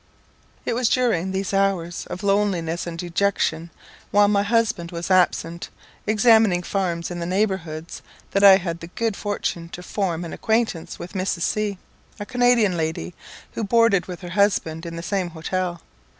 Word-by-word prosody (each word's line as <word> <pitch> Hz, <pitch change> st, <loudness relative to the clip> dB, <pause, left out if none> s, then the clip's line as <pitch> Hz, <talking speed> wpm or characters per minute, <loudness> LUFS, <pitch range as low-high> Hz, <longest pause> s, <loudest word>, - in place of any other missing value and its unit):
It -, -, 0 dB
was 240 Hz, -1 st, +1 dB
during 220 Hz, -8 st, +1 dB
these 190 Hz, +1 st, -2 dB
hours 195 Hz, -4 st, 0 dB
of 180 Hz, -, -6 dB
loneliness 190 Hz, -5 st, 0 dB
and 165 Hz, -1 st, -5 dB
dejection, 170 Hz, -2 st, 0 dB, 0.4 s
while 205 Hz, 0 st, +5 dB
my 205 Hz, -1 st, +3 dB
husband 205 Hz, -5 st, +1 dB
was 170 Hz, +2 st, -4 dB
absent 170 Hz, -2 st, +1 dB, 0.4 s
examining 215 Hz, -4 st, +4 dB
farms 175 Hz, -3 st, -2 dB
in 175 Hz, -, -4 dB
the 170 Hz, -, -3 dB
neighbourhoods 180 Hz, -5 st, -2 dB, 0.3 s
that 200 Hz, -, +1 dB
I 195 Hz, -1 st, +10 dB
had 170 Hz, -3 st, -4 dB
the 165 Hz, -, -8 dB
good 225 Hz, +4 st, -2 dB
fortune 185 Hz, -5 st, -3 dB
to 180 Hz, -, -8 dB
form 180 Hz, -3 st, -2 dB
an 165 Hz, -, -6 dB
quaintance 220 Hz, -7 st, 0 dB
with 175 Hz, -, -9 dB
Mrs. 185 Hz, -3 st, -1 dB
C, 210 Hz, -2 st, -1 dB, 0.4 s
a 205 Hz, -, -4 dB
Canadian 245 Hz, -5 st, +3 dB
lady, 160 Hz, -, -3 dB, 0.4 s
who 225 Hz, -, -4 dB
boarded 215 Hz, -3 st, +3 dB
with 180 Hz, -1 st, -7 dB
her 175 Hz, -, -7 dB
husband 170 Hz, -4 st, +1 dB
in 165 Hz, -, -6 dB
the 170 Hz, -, -6 dB
same 185 Hz, -1 st, -1 dB
hotel. 175 Hz, +1 st, -3 dB
185 Hz, 165 wpm, -23 LUFS, 170-205 Hz, 0.4 s, I